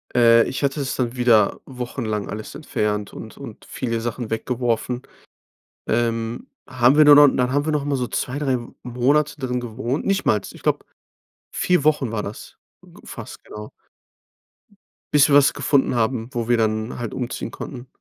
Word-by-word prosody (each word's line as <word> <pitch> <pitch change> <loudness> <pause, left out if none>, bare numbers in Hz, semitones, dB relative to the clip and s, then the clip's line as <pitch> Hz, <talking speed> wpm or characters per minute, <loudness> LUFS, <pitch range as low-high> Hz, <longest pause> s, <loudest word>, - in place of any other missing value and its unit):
Äh, 115 -1 +6
ich 135 - -4
hatte 140 +1 0
es 135 - -2
dann 120 -1 -2
wieder 115 -5 +3
wochenlang 120 -5 -4
alles 105 0 -7
entfernt 105 -8 -2
und - - -10
und - - -10
viele 115 -2 -3
Sachen 120 0 -4
weggeworfen. 120 +1 -1 0.9
Ähm, 115 - -1 0.2
haben 130 +1 +3
wir 155 - +7
nur 145 0 +9
noch 145 0 +8
dann 125 0 +1
haben 145 +1 +1
wir 155 - -1
nochmal 145 -1 0
so 125 - -1
2, 130 +3 -3
3 135 -4 0 0.2
Monate 140 +5 +1
drin 125 -2 -2
gewohnt. 120 +4 -3
Nichtmals, 150 - +1
ich - - -15
glaube, - - 0 0.7
4 180 -5 +1
Wochen 150 -6 +2
war 105 -2 -2
das 105 +1 -9 0.5
fast - - -9
genau 105 0 -9 1.4
bis 150 0 +6
wir 140 - +5
was 145 -1 +6
gefunden 135 -3 +1
haben, 115 0 0
wo 120 -2 -3
wir 120 - +4
dann 110 +1 -1
halt 120 -3 -4
umziehen 125 -1 -4
konnten. 130 -2 -8
125 Hz, 165 wpm, -22 LUFS, 115-140 Hz, 1.4 s, nur